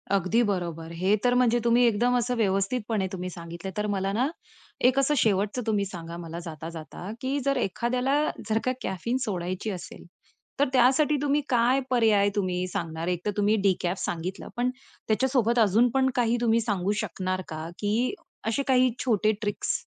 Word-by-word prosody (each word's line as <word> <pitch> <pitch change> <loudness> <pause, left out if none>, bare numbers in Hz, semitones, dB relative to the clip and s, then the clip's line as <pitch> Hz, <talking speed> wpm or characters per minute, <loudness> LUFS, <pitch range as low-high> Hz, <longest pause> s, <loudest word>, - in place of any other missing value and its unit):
अगदी 200 +4 +2
बरोबर. 170 -5 -3
हे 185 +5 +2
तर 245 0 +3
म्हणजे 240 -1 +3
तुम्ही 235 +1 +4
एकदम 240 +2 +2
असं 245 +1 0
व्यवस्थितपणे 205 0 0
तुम्ही 185 -1 -4
सांगितल 170 +1 -7
तर 210 0 0
मला 195 -1 -1
ना, 245 +6 +2 0.5
एक 255 +2 +4
असं 275 +2 +2
शेवटचं 210 +1 +1
तुम्ही 205 -2 +1
सांगा 170 -3 -7
मला 170 -1 -6
जाता, 160 -1 -6
जाता 170 +3 -8
की 270 +2 -1
जर 275 -1 +2
एखाद्याला 250 +4 0 0.3
जर 220 +1 +2
का 255 - +2
कॅफीन 190 +7 -2
सोडायची 185 +1 -3
असेल, 180 -3 -8 0.5
तर 285 - +4
त्यासाठी 265 +4 +4
तुम्ही 290 0 +2
काय 245 +1 +3
पर्याय 220 -5 +4
तुम्ही 185 -2 -1
सांगणार? 165 -3 -4
एकतर 180 +3 -1
तुम्ही 205 +1 +3
डिकॅफ 180 0 0
सांगितलं, 175 +3 -4
पण 245 +1 +1 0.4
त्याच्यासोबत 240 0 +2
अजून 225 +3 +4
पण 265 +1 +2
काही 240 -1 +2
तुम्ही 230 -1 +3
सांगू 205 -4 -1
शकणार 185 -2 -3
का? 155 0 -6
की 220 - 0 0.3
असे 230 +5 0
काही 255 -1 +4
छोटे 215 -3 +3
ट्रिक्स? 205 -1 -1
210 Hz, 165 wpm, -26 LUFS, 185-245 Hz, 0.5 s, तुम्ही